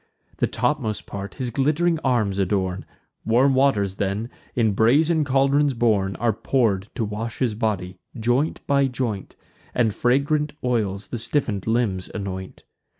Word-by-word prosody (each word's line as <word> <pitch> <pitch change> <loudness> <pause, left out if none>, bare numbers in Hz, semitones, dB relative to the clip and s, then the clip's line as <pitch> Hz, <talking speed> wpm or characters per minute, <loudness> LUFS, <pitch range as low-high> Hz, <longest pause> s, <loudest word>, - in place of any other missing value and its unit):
The - - +1
topmost 120 -9 -1
part 100 0 -7
his 125 -3 -3
glitt'ring 155 +6 +1
arms 110 -7 +1
adorn; 95 -1 0 0.4
Warm 125 +5 +3
waters, 105 -8 +2
then, 100 +4 -2 0.2
in 115 -3 +3
brazen 150 +10 +3
caldrons 140 0 +2
borne, 105 -5 +1
Are 115 -1 +1
pour'd 105 -4 0
to 115 - -1
wash 110 +2 -5
his 125 -5 0
body, 100 -5 -2 0.2
joint 120 +7 0
by 140 -1 +3
joint, 125 -6 -4 0.4
And 115 -4 +2
fragrant 140 +6 +1
oils 105 -5 -1
the 120 - -3
stiffen'd 110 -5 -1
limbs 110 -5 0
anoint. 95 -2 -6
115 Hz, 140 wpm, -23 LUFS, 100-135 Hz, 0.4 s, Warm